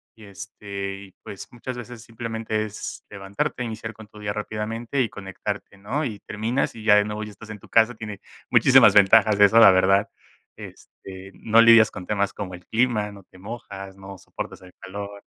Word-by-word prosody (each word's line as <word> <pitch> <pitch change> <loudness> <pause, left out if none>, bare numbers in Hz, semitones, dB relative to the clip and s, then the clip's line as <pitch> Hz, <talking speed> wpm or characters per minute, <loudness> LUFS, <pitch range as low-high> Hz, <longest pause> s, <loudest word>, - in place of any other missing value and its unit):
y, 110 - -15
este, 100 0 -7
y - - -21
pues 100 - -9
muchas 125 +1 -7
veces 120 -1 -9
simplemente 115 -2 -4
es 105 -1 -8
levantarte, 100 +4 -4
iniciar 110 -1 -6
con 110 0 -14
tu 105 +1 -15
día 105 -1 -3
rápidamente 110 +5 -3
y 115 - 0
conectarte, 100 +1 -7
¿no?, 120 +10 -3
y 110 -6 -5
terminas 110 +7 -2
y 110 - -10
ya 105 -1 +6
de 105 0 +4
nuevo 105 0 -5
ya 105 - -8
estás 105 +2 -14
en 105 -1 -8
tu - - -18
casa, 115 +1 +3
tiene 110 -3 -8 0.3
muchísimas - - +6
ventajas 105 +1 +5
eso 105 +2 +6
la 100 - +9
verdad, 95 +3 +3 0.5
este, 95 0 -12
no 115 +4 +3
lidias 115 -1 +7
con 90 - -9
temas 100 0 -1
como 95 -3 -7
el 90 0 -11
clima, 110 -3 0
no 100 -1 -14
te 95 - -20
mojas, 100 -2 -9
no 95 0 -10
soportas - - -8
el 90 -1 -16
calor, 100 +1 -8
105 Hz, 190 wpm, -23 LUFS, 100-110 Hz, 0.5 s, la